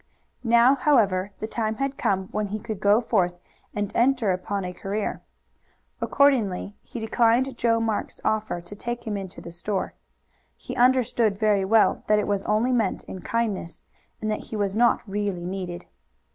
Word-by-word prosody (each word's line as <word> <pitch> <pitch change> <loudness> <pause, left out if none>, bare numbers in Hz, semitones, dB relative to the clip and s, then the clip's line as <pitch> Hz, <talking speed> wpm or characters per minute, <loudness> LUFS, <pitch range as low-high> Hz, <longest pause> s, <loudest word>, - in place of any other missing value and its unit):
Now, 235 +2 +5
however, 215 -10 +2
the - - -3
time 220 0 -2
had 275 +3 -2
come 190 -6 0
when 210 -1 -2
he 205 +2 -3
could 215 -2 -6
go 205 +3 +4
forth 180 -6 +1 0.4
and 205 -1 -2
enter 245 -4 +3
upon 185 +1 -2
a 180 - -5
career. 200 +3 -3 0.8
Accordingly 220 -9 +2
he 240 - -8
declined 235 +3 +2
Joe 230 -1 +2
Marks' 225 -2 -2
offer 215 -5 0
to 175 +4 -10
take 240 +3 -5
him 215 -2 -2
into 195 -2 -7
the 170 - -9
store. 190 +3 -3 0.6
He - - -7
understood 240 -4 +3
very 205 -2 +2
well 220 +2 +3
that 210 - +4
it 210 - +1
was 200 -1 0
only 220 +4 +2
meant 225 -6 0
in 185 - -8
kindness, 215 -7 -2 0.4
and 215 0 -2
that 215 - -3
he - - -7
was 200 -2 -1
not 235 0 +3
really 200 -3 -2
needed. 180 -1 -5
215 Hz, 170 wpm, -25 LUFS, 195-235 Hz, 0.8 s, Now